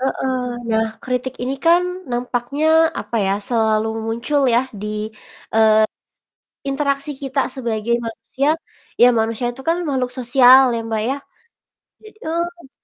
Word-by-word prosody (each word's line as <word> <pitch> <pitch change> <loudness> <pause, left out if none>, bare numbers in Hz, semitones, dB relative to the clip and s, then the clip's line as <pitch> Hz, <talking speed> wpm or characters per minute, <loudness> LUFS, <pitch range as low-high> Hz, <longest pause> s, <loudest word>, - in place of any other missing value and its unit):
Heeh, 265 0 -1 0.4
nah 220 0 +2 0.2
kritik 255 0 -2
ini 260 +2 -1
kan 340 +2 +6 0.3
nampaknya 245 +4 -1 0.3
apa 235 - -5
ya, 195 - +2 0.2
selalu 220 -2 +2 0.2
muncul 240 +6 0
yah 245 +3 +2
di, 210 - -4 0.7
eee, 220 -1 +5 0.7
se - - -62
interaksi 280 0 -1
kita 270 0 -2 0.2
sebagai 235 -3 -1
manusia, 230 +5 -3 0.5
ya - - +10
manusia 225 +2 -1
itu 255 +2 -11
kan 335 - +2
makhluk 260 -3 0
sosial 255 +1 +7
ya, - - -1
Mbak, 220 -1 -1
ya? 270 - 0 0.9
Jadi 430 0 -15
eee 340 -2 -3
250 Hz, 135 wpm, -20 LUFS, 230-275 Hz, 0.9 s, ya